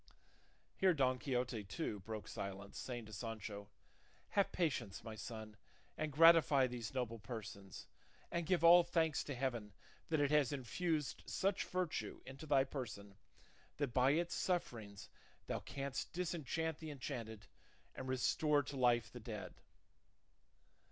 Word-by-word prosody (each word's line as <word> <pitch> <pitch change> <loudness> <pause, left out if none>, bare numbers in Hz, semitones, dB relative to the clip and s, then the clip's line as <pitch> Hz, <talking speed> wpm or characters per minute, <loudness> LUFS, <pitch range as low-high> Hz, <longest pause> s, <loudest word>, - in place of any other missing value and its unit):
Here 185 -2 +4
Don 130 -3 +2
Quixote, 125 -4 -1
too, 105 - -3
broke 110 +2 -6
silence, 100 0 -6
saying 120 -3 -5
to 110 - -11
Sancho, 105 -1 -5 0.6
"Have 200 -1 +2
patience, 130 - -1
my 110 - -6
son, 110 -1 -7 0.4
and 155 -1 -2
gratify 160 -3 +7
these 120 -4 -4
noble 115 -3 -2
persons, 105 -4 -7 0.5
and 170 -2 -1
give 180 -3 +2
all 175 +1 +10
thanks 165 -2 +1
to 140 - -4
heaven 120 -5 -2 0.4
that 160 -2 +2
it 145 0 +3
has 150 -4 +4
infused 150 +3 -1
such 195 0 +1
virtue 180 -3 -2
into 135 +4 -9
thy 140 -2 +5
person, 105 -8 -6 0.6
that 140 -5 -1
by 130 +2 +5
its 170 +2 0
sufferings 110 - -2 0.4
thou - - -2
canst 140 -1 -4
disenchant 160 -2 -2
the 160 - -6
enchanted 115 -7 -5 0.5
and 130 - -6
restore 145 +3 +2
to 140 0 -6
life 120 -3 +3
the 125 - -8
dead." 110 -2 -6
130 Hz, 140 wpm, -38 LUFS, 110-155 Hz, 0.6 s, all